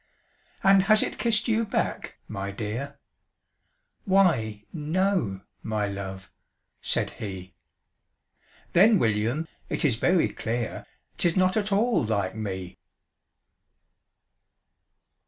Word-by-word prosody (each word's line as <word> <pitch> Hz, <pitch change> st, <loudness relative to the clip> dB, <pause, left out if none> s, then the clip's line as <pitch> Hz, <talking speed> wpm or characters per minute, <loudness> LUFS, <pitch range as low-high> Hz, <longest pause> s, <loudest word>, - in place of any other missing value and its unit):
"And 195 Hz, 0 st, +6 dB
has 215 Hz, 0 st, +6 dB
it -, -, -4 dB
kissed 230 Hz, -1 st, +2 dB
you 225 Hz, 0 st, +2 dB
back, 215 Hz, -, -2 dB
my 100 Hz, 0 st, -4 dB
dear?" 115 Hz, +8 st, -5 dB, 1.1 s
"Why 125 Hz, -, +2 dB
no 165 Hz, -, 0 dB, 0.2 s
my 105 Hz, -2 st, -1 dB
love," 95 Hz, -1 st, -7 dB, 0.5 s
said -, -, 0 dB
he. 95 Hz, -3 st, -7 dB, 1.2 s
"Then, 205 Hz, +5 st, +6 dB
William, 115 Hz, -, 0 dB, 0.2 s
it -, -, 0 dB
is 125 Hz, -7 st, +2 dB
very 175 Hz, +7 st, +3 dB
clear 115 Hz, 0 st, -4 dB, 0.3 s
'Tis 170 Hz, +1 st, +2 dB
not 185 Hz, 0 st, +3 dB
at 210 Hz, -1 st, 0 dB
all 220 Hz, -, +2 dB
LIKE 100 Hz, -4 st, -1 dB
ME!" 95 Hz, -4 st, -5 dB
125 Hz, 100 wpm, -26 LUFS, -, 1.2 s, And